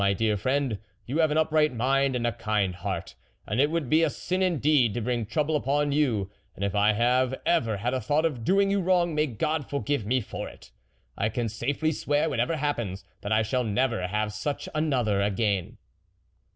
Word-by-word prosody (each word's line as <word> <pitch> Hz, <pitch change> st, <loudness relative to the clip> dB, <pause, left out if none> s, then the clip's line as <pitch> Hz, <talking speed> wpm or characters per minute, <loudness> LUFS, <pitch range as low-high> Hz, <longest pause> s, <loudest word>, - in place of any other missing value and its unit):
my 100 Hz, 0 st, +3 dB
dear 110 Hz, +1 st, +1 dB
friend, 130 Hz, 0 st, 0 dB, 0.3 s
you 140 Hz, +7 st, -2 dB
have 160 Hz, -1 st, +4 dB
an 150 Hz, -, 0 dB
upright 155 Hz, -1 st, +3 dB
mind 135 Hz, +2 st, +1 dB
and 120 Hz, -1 st, -1 dB
a 120 Hz, -, +2 dB
kind 105 Hz, -4 st, -1 dB
heart, 90 Hz, -, -4 dB, 0.3 s
and 105 Hz, +6 st, 0 dB
it 145 Hz, -, +3 dB
would 165 Hz, -4 st, -1 dB
be 155 Hz, +5 st, +4 dB
a 165 Hz, -, +3 dB
sin 185 Hz, +5 st, -3 dB
indeed 150 Hz, -, +2 dB
to -, -, -1 dB
bring 120 Hz, 0 st, -1 dB
trouble 155 Hz, +5 st, 0 dB
upon 145 Hz, +1 st, +1 dB
you; 125 Hz, -10 st, +1 dB, 0.3 s
and 100 Hz, -, -2 dB
if 100 Hz, -, -2 dB
I 105 Hz, +1 st, +3 dB
have 125 Hz, +3 st, +2 dB
ever 115 Hz, -11 st, +2 dB
had 120 Hz, +5 st, -2 dB
a 130 Hz, -, -1 dB
thought 150 Hz, +7 st, +1 dB
of 130 Hz, -8 st, -2 dB
doing 195 Hz, -, +3 dB
you 200 Hz, 0 st, +2 dB
wrong, 175 Hz, -2 st, +2 dB
may 150 Hz, 0 st, +1 dB
God 150 Hz, +4 st, -2 dB
forgive 140 Hz, -3 st, -1 dB
me 130 Hz, +3 st, +2 dB
for 110 Hz, -, -6 dB
it! -, -, -16 dB, 0.4 s
I 110 Hz, -, 0 dB
can 115 Hz, +1 st, -2 dB
safely 140 Hz, +8 st, -1 dB
swear, 150 Hz, +1 st, 0 dB
whatever 125 Hz, +6 st, 0 dB
happens, 120 Hz, -10 st, -2 dB, 0.2 s
that 100 Hz, -, -5 dB
I 110 Hz, +1 st, +3 dB
shall 125 Hz, +3 st, 0 dB
never 115 Hz, -3 st, 0 dB
have 105 Hz, +2 st, -1 dB
such 140 Hz, +7 st, -3 dB
another 125 Hz, -10 st, +1 dB
again." 100 Hz, -2 st, 0 dB
130 Hz, 205 wpm, -27 LUFS, 110-150 Hz, 0.4 s, have